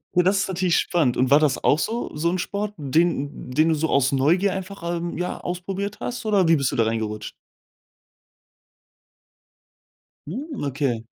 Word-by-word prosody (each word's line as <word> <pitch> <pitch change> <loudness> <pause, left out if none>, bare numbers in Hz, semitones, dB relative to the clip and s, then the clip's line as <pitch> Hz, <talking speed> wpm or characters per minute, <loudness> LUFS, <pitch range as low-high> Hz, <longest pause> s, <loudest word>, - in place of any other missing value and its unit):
Oh, 180 - +6
das 190 +3 +2
ist - - -3
natürlich 180 -2 +1
spannend. 155 -9 +1
Und 130 +2 +1
war 145 - +8
das 150 -4 +1
auch 150 - +4
so 230 -1 -3
so 160 +3 +1
'n 180 - 0
Sport, 205 +3 -3
den 145 -2 0
den 155 +5 +3
du - - +3
so 160 +1 -1
aus 135 -1 +3
Neugier 170 +9 +2
einfach, 190 -1 -6
ähm, 170 0 -4
ja 180 0 -3
ausprobiert 195 +4 -4
hast, 245 - -4
oder 200 -5 +3
wie 165 - +6
bist 140 -4 0
du - - -3
da 115 - +3
reingerutscht? 110 -1 -3 2.9
Hm, 265 - -5
okay. 135 -5 -1
170 Hz, 170 wpm, -23 LUFS, 140-190 Hz, 2.9 s, war